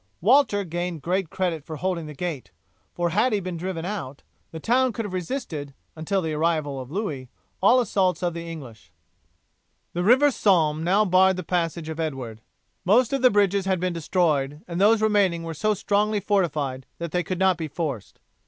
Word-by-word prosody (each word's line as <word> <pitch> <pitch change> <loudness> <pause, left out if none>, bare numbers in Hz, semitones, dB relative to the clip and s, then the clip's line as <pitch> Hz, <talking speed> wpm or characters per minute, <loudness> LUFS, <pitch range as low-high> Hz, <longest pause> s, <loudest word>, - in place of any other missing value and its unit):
Walter 220 - +4
gained 175 -3 -4
great 180 +1 -1
credit 175 -5 -2
for 160 +1 -7
holding 170 -1 -2
the 150 - -9
gate, 160 -4 -4 0.4
for 175 -1 -1
had 215 +7 +2
he 210 - +2
been 185 -2 -5
driven 170 -1 -4
out, 175 -9 -5 0.3
the 160 - -8
town 250 +6 +2
could 225 +1 -4
have 195 - -6
resisted, 165 - -4 0.2
until 175 +4 -1
the 160 -1 -2
arrival 155 -3 0
of 130 -1 -8
Louis, 150 - -4 0.3
all 235 +7 +6
assaults 185 -7 +1
of 175 -1 0
the 170 0 -6
English. 115 - -11 1.0
The 175 - -1
river 260 +8 +5
Somme 160 - +2
now 195 +5 +3
barred 190 0 +4
the 185 - -4
passage 170 -2 -2
of 160 0 -6
Edward. 130 -8 -4 0.4
Most 235 +7 +3
of 275 - 0
the 255 - +7
bridges 200 -2 +2
had 190 -2 +1
been 180 0 -1
destroyed, 155 -4 0
and 175 +1 -3
those 215 +2 +4
remaining 200 -6 +2
were 165 0 -5
so 215 +7 0
strongly 210 +1 +1
fortified 155 - -1
that 170 -2 -5
they 180 - +1
could 180 +2 -4
not 190 0 +3
be 160 -2 -4
forced. 145 - -5
175 Hz, 190 wpm, -24 LUFS, 155-200 Hz, 1.0 s, the